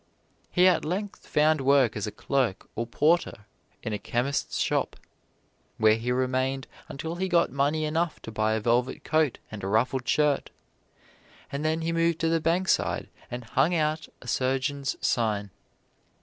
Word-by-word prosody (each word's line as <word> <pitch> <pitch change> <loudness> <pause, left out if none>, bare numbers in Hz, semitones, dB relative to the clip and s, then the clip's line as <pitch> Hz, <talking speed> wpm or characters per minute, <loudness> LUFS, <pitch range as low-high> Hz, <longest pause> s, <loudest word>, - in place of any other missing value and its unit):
He 180 0 +4
at 180 -3 +3
length 195 +5 -4
found 155 0 +3
work 135 -4 +4
as 105 0 -2
clerk 130 -8 0
or 115 +1 -2
porter 150 -5 +1 0.4
in 110 - -3
a 105 - -2
chemist's 130 +4 -1
shop, - - 0 0.8
where 110 -1 +5
he 120 +2 -2
remained 130 +1 0 0.2
until 160 +5 -5
he 190 +1 -1
got 175 -1 +3
money 145 +3 +1
enough 160 +2 -1
to 115 - -7
buy 110 0 +1
a 110 - +1
velvet 120 +3 0
coat 155 -5 +1
and 105 -3 -7
a - - -2
ruffled 125 +4 +1
shirt, 150 0 +2 1.0
and 140 +2 -3
then 160 +1 0
he 165 +1 -1
moved 165 0 +2
to 165 - +2
the 165 0 +1
Bankside 175 +4 +1 0.2
and 120 0 -5
hung 135 +9 +1
out 155 -1 0 0.2
a - - -12
surgeon's 135 +3 0
sign. 105 -4 0
140 Hz, 160 wpm, -27 LUFS, 120-160 Hz, 1.0 s, where